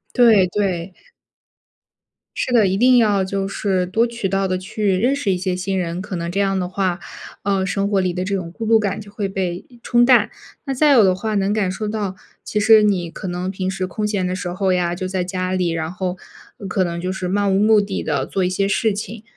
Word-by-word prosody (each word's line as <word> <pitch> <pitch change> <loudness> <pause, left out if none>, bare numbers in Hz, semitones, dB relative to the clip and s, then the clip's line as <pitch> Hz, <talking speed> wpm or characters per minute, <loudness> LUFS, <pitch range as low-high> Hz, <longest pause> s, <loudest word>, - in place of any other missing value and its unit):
对， 225 -6 +6
对。 185 -2 -2 1.4
是 - - -2
的， 230 -4 +5
一 190 - 0
定 250 +3 +5
要 205 -4 +3
就 195 +1 -2
是 195 -2 -1
多 225 +6 +1
渠 235 -4 -3
道 195 0 0
地 185 0 -1
去 195 +2 -1
认 245 +8 +2
识 230 -9 -1
一 180 - 0
些 185 0 -2
新 190 +1 -2
人。 175 0 -2
可 200 -1 -6
能 170 0 -3
这 195 - -2
样 195 -1 +1
的 180 - -2
话， 185 -1 -1 0.4
呃， 195 -1 +1
生 195 +1 -1
活 200 -2 +1
里 185 -1 0
的 180 +1 -3
这 200 +1 -1
种 175 -3 -4
孤 225 +5 -6
独 225 0 +4
感 205 -1 -2
就 205 -1 -11
会 200 -2 -3
被 185 -2 -3 0.2
冲 240 0 +3
淡。 240 -4 +4 0.3
那 275 - -2
再 295 +3 +3
有 230 - +6
的 190 -2 +4
话 215 +3 -3
能 200 0 +1
感 200 -4 0
受 215 +3 -4
到， 210 -3 -3 0.3
其 210 - -2
实 220 +1 +6
你 185 -5 +1
可 190 - -7
能 180 +1 -3
平 185 -1 -3
时 190 -1 -2
空 210 +4 -3
闲 200 -3 -1
的 180 0 -2
时 180 -1 -4
候 185 +1 0
呀 175 -1 0
就 185 +1 -4
在 185 -1 -2
家 185 0 -3
里， 180 -2 0
然 165 -1 -3
后 185 0 -3 0.5
可 190 0 0
能 170 -1 -3
就 180 +1 -3
是 185 -1 -4
漫 195 +1 +1
无 - - +2
目 215 +1 +5
的 200 -1 -2
地 - - -1
做 190 - -2
一 180 - +1
些 195 +2 0
事 215 +1 +1
情。 215 +2 -6
195 Hz, 255 characters per minute, -20 LUFS, 185-210 Hz, 1.4 s, 对